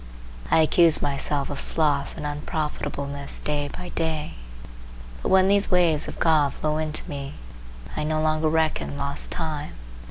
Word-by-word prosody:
I 160 - +5
accuse 165 0 +5
myself 140 0 -1
of 140 - -2
sloth 145 -3 +1
and - - -5
unprofitableness 145 -2 -3
day 145 -1 -2
by 180 +4 -8
day; 160 -3 -2 0.9
but - - -2
when 190 0 +5
these 200 0 +3
waves 170 -5 +3
of - - -7
God 155 -4 +3
flow 155 0 -1
into 155 -1 -1
me 140 -1 -6 0.6
I 155 - -2
no 155 +1 0
longer 155 0 +1
reckon 160 -2 0
lost 140 0 -3
time. 155 -3 -4
155 Hz, 150 wpm, -24 LUFS, 145-160 Hz, 0.9 s, I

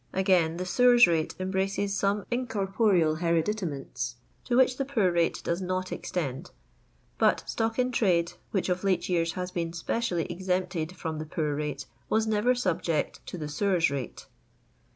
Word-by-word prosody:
Again, 180 -4 +2
the 185 - -3
sewers 245 +5 +6
rate 165 -2 0
em 185 0 -2
braces 195 +1 0
some 200 0 0
incorporeal 195 -8 +1
hereditaments 160 - -1 0.3
to 240 - +1
which 255 -1 +4
the 275 - 0
poor 230 -9 +1
rate 170 -1 +1
does 170 +2 -1
not 185 0 -2
extend; 135 -7 -4 0.7
but - - +3
stock 225 0 -1
in 250 0 +1
trade, 175 -8 +2 0.2
which 195 - -1
of 180 0 -1
late 185 -3 +1
years 165 -2 +1
has 180 +1 -4
been 170 -2 -3
specially 175 0 -1
exempted 180 -1 -2
from 160 -2 -4
the 155 - -4
poor 150 -1 -1
rate, 150 -1 -3 0.2
was 220 0 +2
never 220 +3 +2
subject 170 -8 -1
to - - -6
the 155 -3 -4
sewers 170 0 +1
rate. 135 -4 -5
180 Hz, 160 wpm, -28 LUFS, 165-205 Hz, 0.7 s, sewers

